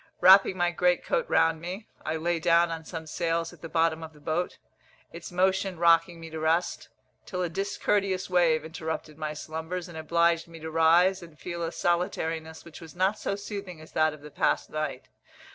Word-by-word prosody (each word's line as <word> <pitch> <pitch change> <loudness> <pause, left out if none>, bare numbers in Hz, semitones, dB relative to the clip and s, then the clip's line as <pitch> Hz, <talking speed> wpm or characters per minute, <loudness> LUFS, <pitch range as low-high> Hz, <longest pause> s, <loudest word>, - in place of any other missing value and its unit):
Wrapping 190 +1 +7
my 175 -1 +2
great 180 0 +1
coat - - 0
round 160 0 +3
me, 185 +5 -6 0.2
I 155 - -2
lay 170 +1 0
down 170 0 +4
on 165 -1 -5
some 165 -1 -6
sails 165 +1 -2
at - - -17
the 165 - -7
bottom 165 0 +1
of 160 -1 -8
the 150 - -17
boat, 160 +4 -2 0.6
its - - -8
motion 190 0 +1
rocking 165 0 +4
me 165 -1 -9
to 160 - -5
rest, 160 +3 0 0.4
till 180 -1 -2
a 175 - -1
discourteous 195 +1 0
wave 165 -4 +3
interrupted 160 -1 -5
my 155 -1 -3
slumbers, 160 +4 -5
and 165 -2 -8
obliged 170 +1 +2
me 165 -1 -11
to 160 0 -6
rise 170 +4 +4
and 165 -3 -13
feel 170 +1 -6
a 165 -1 -2
solitariness 165 -3 -2
which 170 0 -12
was 165 0 -11
not 190 +4 +1
so - - -2
soothing 200 -4 -7
as 155 - -13
that 155 0 +3
of 150 -1 -12
the 150 0 -11
past - - 0
night. 155 0 -4
165 Hz, 195 wpm, -27 LUFS, 160-180 Hz, 0.6 s, Wrapping